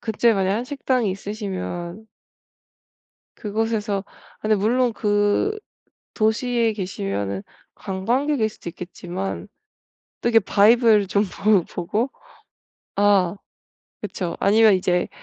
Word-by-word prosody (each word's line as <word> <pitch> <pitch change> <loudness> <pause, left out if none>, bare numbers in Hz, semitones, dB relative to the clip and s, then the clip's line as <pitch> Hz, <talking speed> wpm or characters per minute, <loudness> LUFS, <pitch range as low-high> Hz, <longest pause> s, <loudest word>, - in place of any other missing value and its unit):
그때 230 +1 +2
만약 195 -1 +1
한식당이 250 -3 -1
있으시면 195 -1 -5 1.3
그곳에서 210 -2 -2
아 - - -23
근데 215 0 +2
물론 240 +4 +2
그 205 - +1 0.6
도시에 230 +1 +1
계시면은 100 - -3 0.3
관광객일 230 +6 0
수도 195 - -9
있겠지만 180 +3 -6 0.7
또 235 - +1
이렇게 225 -3 +4
vibe를 215 0 +5
좀 200 +2 +2
보 200 -1 +2
보고 210 +9 -2 0.9
아 200 -3 +3 0.6
그쵸 180 -3 -4
아니면 215 0 +5
이제 180 -1 +1
205 Hz, 235 characters per minute, -22 LUFS, 190-225 Hz, 1.3 s, vibe를